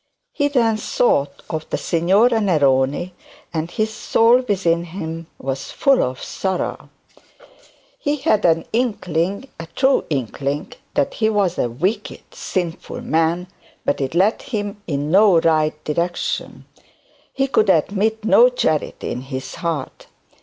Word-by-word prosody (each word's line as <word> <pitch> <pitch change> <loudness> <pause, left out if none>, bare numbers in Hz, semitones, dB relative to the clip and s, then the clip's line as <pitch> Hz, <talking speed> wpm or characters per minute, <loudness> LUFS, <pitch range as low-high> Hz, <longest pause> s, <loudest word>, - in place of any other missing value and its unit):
He 285 -2 +1
then 235 -6 +2
thought 145 - 0
of 155 -1 -5
the - - -1
Signora 200 +8 +3
Neroni, 145 -2 +2 0.4
and 160 0 -2
his 215 +4 -2
soul 230 +2 +4
within 170 -4 +1
him 165 -2 -6
was 135 0 -4
full 275 -2 +3
of 130 0 -3
sorrow. 190 -2 -3 1.1
He 290 -10 0
had 215 -7 +1
an 165 -1 +3
inkling 200 - -1
a 165 - -7
true 265 0 +3
inkling 140 +1 -3 0.2
that 280 -1 +1
he 220 -1 +1
was 200 -5 0
a 120 - +1
wicked 185 - -2
sinful 175 -4 -4
man; 165 +2 +1 0.4
but 145 - 0
it 135 +4 -2
led 195 +5 +3
him 205 -3 -4
in 145 0 -2
no 195 -2 +6
right 155 -2 +1
direction; 170 +3 -2 0.7
he 270 - 0
could 220 -6 +2
admit 210 +6 +1
no 485 - +6
charity - - -1
in 125 - -4
his 130 0 -6
heart. 165 -5 -4
175 Hz, 135 wpm, -20 LUFS, 155-220 Hz, 1.1 s, no